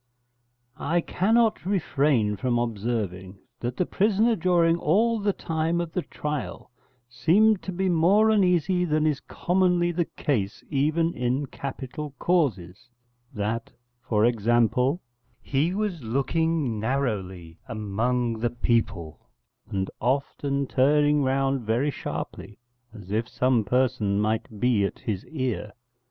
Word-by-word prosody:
I 170 +3 +1
cannot 220 +6 +2
refrain 140 - +1
from 125 +2 0
observing 105 -5 -3 0.2
that 120 +1 -4
the 180 - +1
prisoner 215 +5 +2
during 170 -3 +3
all 225 +6 +2
the 205 0 +1
time 165 -1 -1
of 170 -2 -3
the 180 - -1
trial 150 -6 -5 0.4
seemed 180 - +3
to 190 - -5
be 190 +1 -1
more 185 +6 +4
uneasy 180 -3 +2
than 155 -2 +1
is 150 -3 +1
commonly 180 -1 +1
the 170 0 0
case 105 - -1
even 155 +4 +1
in 125 +3 -1
capital 140 +2 -7
causes: 115 - -1 0.4
that, 110 +2 -3 0.3
for 110 -2 +1
example, 120 - +2 0.4
he 145 +5 0
was 205 -6 -2
looking 140 +1 0
narrowly 100 -9 -3
among 115 +2 -1
the 120 +1 0
people 115 - -2 0.4
and 95 -1 -2
often 140 +2 -1
turning 145 +3 +3
round 135 0 +1
very 120 +6 0
sharply, 110 - -6 0.3
as 100 -4 -11
if 115 +3 -1
some 125 -3 +2
person 115 -3 +1
might 110 0 -2
be 120 -4 +2
at 100 - -2
his 100 -4 -4
ear. 125 -8 -3
135 Hz, 125 wpm, -25 LUFS, 115-170 Hz, 0.4 s, more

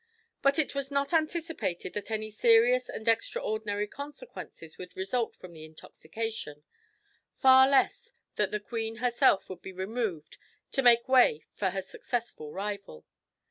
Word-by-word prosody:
But 275 +2 +3
it 315 - +1
was 280 -1 -3
not 280 +3 -1
anticipated 315 - -1
that 210 +1 -5
any 215 -1 -3
serious 235 +3 +4
and 220 - -7
extraordinary 220 - 0
consequences 285 - -10
would 180 - -9
result 225 +5 -1
from 180 -2 -12
the 155 -1 -11
intoxication 155 +1 -7 0.7
far 265 0 +7
less 280 - +2 0.2
that - - +1
the 210 - -2
queen 225 +1 -4
herself 235 -4 +2
would 185 - -9
be 190 - -8
removed 190 -4 -4 0.3
to 270 - +1
make 240 -1 +5
way 250 - +4
for 195 - -1
her 190 +1 -4
successful 230 - -5
rival. 200 - -6
225 Hz, 140 wpm, -29 LUFS, 190-260 Hz, 0.7 s, far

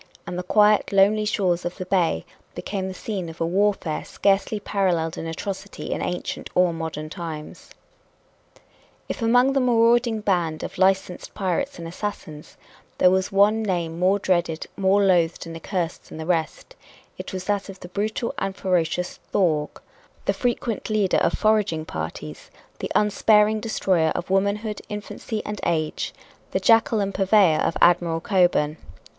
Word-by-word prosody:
And 175 - -5
the 180 - -2
quiet, 210 +3 +3
lonely 205 +2 +4
shores 185 -4 0
of 175 - -4
the 185 - -5
bay 175 - +1 0.3
became 195 -2 -4
the 190 - -5
scene 190 -4 -4
of 165 - -11
a 165 - +1
warfare 185 -3 0
scarcely 200 +2 0
paralleled 180 -6 0
in 165 - -5
atrocity 195 +4 -6
in - - -2
ancient 180 0 -4
or 180 -1 +4
modern 160 -2 -5
times. 155 -2 -8 1.4
If - - -5
among 245 +4 +4
the 275 - +2
marauding 235 -2 +3
band 175 -6 0
of - - -7
licensed 190 -1 +1
pirates 215 +9 -2
and 170 - -7
assassins 165 -4 -7 0.4
there 180 - +5
was 190 0 +1
one 205 +3 +4
name 170 -5 -2
more 185 +2 +3
dreaded, 175 -5 0
more 195 +1 +3
loathed 175 -4 +2
and 165 0 -8
accursed 170 0 -4
than - - -9
the 160 - -5
rest, 170 - -2 0.4
it - - -6
was 185 -2 -4
that 205 +1 -2
of 195 -1 -9
the - - -8
brutal 215 +5 -2
and 195 0 -3
ferocious 180 -1 -1
Thorg 155 -6 0 0.5
the - - +2
frequent 240 -3 -2
leader 210 -4 +2
of - - +2
foraging 210 -7 +1
parties, 80 - -7 0.3
the - - -4
unsparing 210 +1 +4
destroyer 190 -7 +1
of 180 - -4
womanhood, 205 +2 0
infancy 210 +1 -5
and 210 -1 -5
age, 160 -2 -1 0.4
the - - -1
jackal 225 -1 +4
and 195 0 -2
purveyor 190 -5 +4
of - - 0
Admiral 170 -1 +4
Cockburn. 175 -5 +2
190 Hz, 155 wpm, -23 LUFS, 170-210 Hz, 1.4 s, there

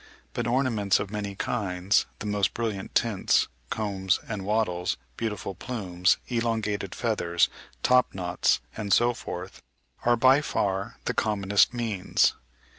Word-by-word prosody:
But - - -2
ornaments 120 -6 +2
of 100 -1 -4
many 100 -2 -4
kinds, 95 -3 0
the - - -7
most 105 -1 0
brilliant 110 -5 -3
tints, 110 -5 +2 0.2
combs 100 -3 0
and 105 -3 -4
wattles, 95 -8 0 0.2
beautiful 105 - -3
plumes, 95 -4 0
elongated 110 -5 -1
feathers, 85 -8 +1 0.3
top 125 -4 +4
knots, 90 -2 +1
and 105 -2 -4
so 120 +3 +4
forth, 95 -4 -7 0.4
are 120 0 +4
by 130 +4 +6
far 100 -8 -1
the - - 0
commonest 100 -2 +2
means. 115 -6 +1
105 Hz, 125 wpm, -27 LUFS, 95-115 Hz, 0.4 s, by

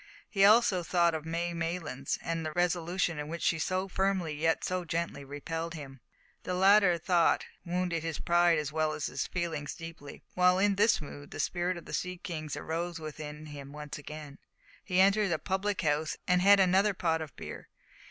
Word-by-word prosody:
He 195 -2 +1
also 210 -3 +6
thought 170 0 +2
of 160 0 -4
May 170 +1 -2
Maylands, 165 -5 -3
and 165 -1 -2
the 155 - -3
resolution 175 0 0
with 150 0 -4
which 170 +2 -5
she 165 - +2
so 185 +3 -1
firmly 190 -4 0
yet 160 +2 +1
so 185 0 -1
gently 165 -3 -3
repelled 165 +4 -5
him. 135 -3 -9 0.4
The 180 - -3
latter 190 -1 +5
thought 170 0 +2 0.2
wounded 175 -1 -1
his 165 -1 -3
pride 175 -1 +3
as 150 -1 -2
well 155 0 0
as 150 - -3
his - - -3
feelings 165 -4 -3
deeply. 165 -4 -10
While 180 0 +4
in 200 +1 +3
this 210 0 +3
mood 145 -1 -9
the - - -8
spirit 175 0 -1
of 170 - -10
the - - -9
sea 180 0 -2
kings 155 -4 -5
arose 165 +3 -3
within 155 -1 -7
him 145 -2 -9
once 150 0 -7
again. 150 -1 -9 0.4
He 185 -2 0
entered 200 0 +4
a 160 - +2
public 195 +3 -1
house 155 0 0
and 180 -1 +3
had 200 +1 +7
another 190 +2 +4
pot 165 -3 0
of 155 -4 -7
beer. - - -8
170 Hz, 190 wpm, -30 LUFS, 155-180 Hz, 0.4 s, had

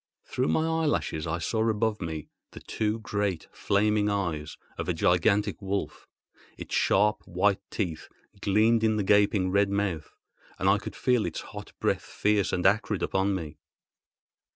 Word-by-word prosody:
Through 130 +2 -1
my - - +2
eyelashes 145 - -1
I 80 +1 -1
saw 110 +6 0
above 110 -1 0
me 80 -3 -5 0.3
the - - -9
two 110 0 -2
great 100 -5 -2
flaming 105 +1 +1
eyes 85 -7 -2 0.2
of - - -4
a - - 0
gigantic 100 +5 +2
wolf. 100 0 -4 0.5
Its - - -8
sharp 105 +2 +2
white 100 +2 +1
teeth 85 -7 -4 0.3
gleamed 110 +3 +3
in 110 -1 +3
the 105 - 0
gaping 100 -1 +3
red 100 +1 +3
mouth, 100 -6 -2 0.5
and 95 - -1
I 100 +1 +4
could - - -8
feel 125 -3 +2
its - - -4
hot - - -10
breath - - 0
fierce 105 -1 0
and 90 - -1
acrid 105 0 +2
upon 95 +1 +1
me. 80 -5 -6
100 Hz, 155 wpm, -27 LUFS, 95-105 Hz, 0.5 s, I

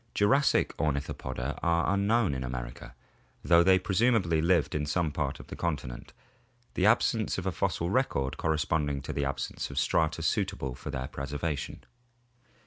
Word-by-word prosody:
Jurassic 135 +8 +3
Ornithopoda 70 -2 -2
are 85 +3 +2
unknown 100 -1 +2
in 65 -1 -3
America, - - -6 0.5
though 85 0 +6
they 95 +1 +5
presumably 95 -4 +2
lived 85 -2 +2
in 75 -1 -1
some 80 +1 0
part 70 -2 -2
of - - -10
the - - -8
continent, 70 -8 -4 0.6
the 95 - +2
absence 110 -1 +2
of 95 - -4
a 95 - +1
fossil 85 0 -1
record 75 - 0
corresponding 75 -2 0
to - - -5
the 70 - -1
absence 70 - -3
of - - -9
strata 80 0 +1
suitable 95 - -1
for - - -8
their 65 0 -3
preservation. 70 +3 -4
80 Hz, 150 wpm, -29 LUFS, 70-95 Hz, 0.6 s, though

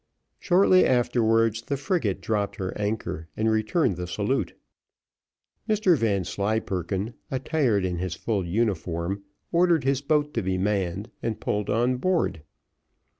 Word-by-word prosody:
Shortly 185 0 +5
afterwards 115 -2 +2
the 140 +4 -3
frigate 140 - -1
dropped 105 -2 -1
her 95 -4 -4
anchor 105 -6 -3
and 110 0 +2
returned 110 - +1
the 90 0 -4
salute. 85 - -1 1.1
Mr 210 -5 +4
Vanslyperken, 100 - -1 0.2
attired 130 - +1
in 90 -2 -2
his 90 -1 -3
full 105 -5 -1
uniform, 90 -1 -1 0.3
ordered 170 -3 +3
his 135 0 +1
boat 150 0 +1
to 115 - 0
be 95 -1 -1
manned 100 0 -1
and 115 -2 -2
pulled 105 0 -2
on 120 +4 +2
board. 170 - 0
110 Hz, 125 wpm, -26 LUFS, 95-135 Hz, 1.1 s, Shortly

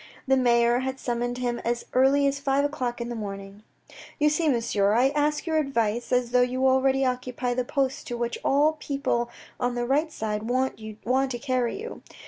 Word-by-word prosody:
The 265 - +4
mayor 240 -1 +3
had 265 +1 -3
summoned 245 0 -2
him 245 -1 -2
as 235 0 -2
early 270 +2 +4
as 280 0 +1
five 280 0 +1
o'clock 255 -5 -3
in 235 0 -4
the 240 - -4
morning. 200 -1 -7 0.3
" - - -16
You 300 0 +4
see, 310 +1 +1
monsieur, 225 -5 +1
I 250 +4 +4
ask 295 +1 0
your 320 -2 0
advice, 235 -5 -1
as 250 -1 +1
though 250 0 +4
you 255 +1 +1
already 265 +1 +3
occupy 250 -1 -2
that 245 0 -2
post 270 -2 -1
to 240 - -4
which 235 0 -2
all 290 +3 +4
the 315 - -15
people 270 -5 -1 0.3
on 245 -1 -1
the 240 0 -1
right 295 +5 +1
side 215 -3 -3
want 260 +1 0
to 240 +4 -2
carry 255 +2 -1
you. 460 +2 -7
250 Hz, 200 wpm, -26 LUFS, 235-275 Hz, 0.3 s, The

